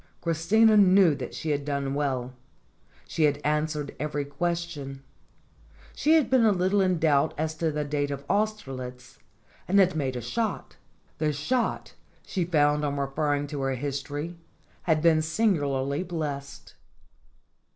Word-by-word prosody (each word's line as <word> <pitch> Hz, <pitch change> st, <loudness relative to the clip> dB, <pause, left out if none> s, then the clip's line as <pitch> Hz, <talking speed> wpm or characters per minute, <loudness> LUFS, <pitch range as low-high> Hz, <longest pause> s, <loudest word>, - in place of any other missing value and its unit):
Christina 210 Hz, -, +3 dB
knew 190 Hz, -4 st, +6 dB
that -, -, -6 dB
she 155 Hz, -, -3 dB
had 145 Hz, -1 st, -1 dB
done 140 Hz, -1 st, -2 dB
well. 130 Hz, -3 st, -2 dB, 0.7 s
She 160 Hz, -, +1 dB
had 145 Hz, -1 st, +1 dB
answered 150 Hz, -1 st, -1 dB
every 145 Hz, 0 st, -2 dB
question. 145 Hz, -3 st, -4 dB, 0.9 s
She 310 Hz, +2 st, +3 dB
had 315 Hz, -4 st, +3 dB
been 260 Hz, -3 st, +3 dB
a 220 Hz, -, +5 dB
little 190 Hz, +1 st, +2 dB
in 185 Hz, -2 st, +2 dB
doubt 150 Hz, -3 st, +2 dB
as 155 Hz, +1 st, -1 dB
to 160 Hz, -1 st, 0 dB
the 150 Hz, 0 st, -2 dB
date 145 Hz, 0 st, -1 dB
of 140 Hz, 0 st, -5 dB
Austerlitz, 135 Hz, -13 st, -3 dB, 0.5 s
and 195 Hz, -, +2 dB
had 185 Hz, -3 st, +4 dB
made 135 Hz, -4 st, -1 dB
a -, -, -2 dB
shot. 225 Hz, -, -3 dB, 0.4 s
The 155 Hz, -1 st, +1 dB
shot, 230 Hz, -, -1 dB, 0.3 s
she 185 Hz, -4 st, -2 dB
found 150 Hz, -3 st, +2 dB
on 145 Hz, -1 st, -1 dB
referring 145 Hz, +1 st, -1 dB
to 145 Hz, -2 st, -4 dB
her 135 Hz, -1 st, 0 dB
history, 145 Hz, +5 st, -4 dB, 0.5 s
had 155 Hz, -1 st, +3 dB
been 160 Hz, -2 st, +5 dB
singularly 145 Hz, -6 st, 0 dB
blessed. 150 Hz, -6 st, -5 dB
150 Hz, 145 wpm, -27 LUFS, 140-175 Hz, 0.9 s, knew